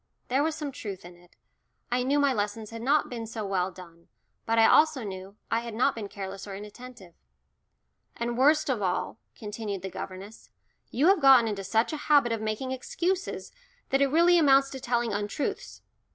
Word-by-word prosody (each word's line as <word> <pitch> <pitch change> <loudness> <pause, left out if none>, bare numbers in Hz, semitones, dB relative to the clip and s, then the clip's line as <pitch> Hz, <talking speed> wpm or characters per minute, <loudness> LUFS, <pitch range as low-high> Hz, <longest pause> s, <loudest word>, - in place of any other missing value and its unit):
There 265 +3 +2
was 315 +1 0
some 300 -3 -5
truth 195 -8 -7
in 175 0 -12
it. 175 0 -23 0.6
I 250 +1 +1
knew 270 +3 +1
my 285 -2 +3
lessons 210 0 -3
had 230 0 -7
not 285 +5 +2
been 230 -2 -6
so 220 -1 -5
well 190 -2 0
done, 170 -2 -14 0.4
but 230 0 +1
I 225 - +6
also 305 -3 +4
knew 190 -1 -8 0.2
I 230 - +2
had 230 -2 -7
not 255 +4 +2
been 215 -3 -6
careless 195 0 -7
or 195 - -6
inattentive. 210 -2 -11 1.0
"And 235 0 -2
worst 300 +5 +3
of 255 -6 -1
all," 185 +3 -2 0.2
continued 210 -3 -6
the 190 - -5
governess, 195 +5 -9 0.4
"you 275 +6 0
have 390 -4 +4
got 265 -4 +7
into 205 -2 -3
such 225 +8 0
a - - -2
habit 285 -5 +5
of 225 -1 -2
making 220 +4 -3
excuses 355 +9 -3 0.4
that 270 +1 +2
it 280 - +5
really 340 +4 +4
amounts 275 -3 +4
to 265 - -6
telling 240 -3 -1
untruths. 205 +7 -4
230 Hz, 190 wpm, -27 LUFS, 200-270 Hz, 1.0 s, got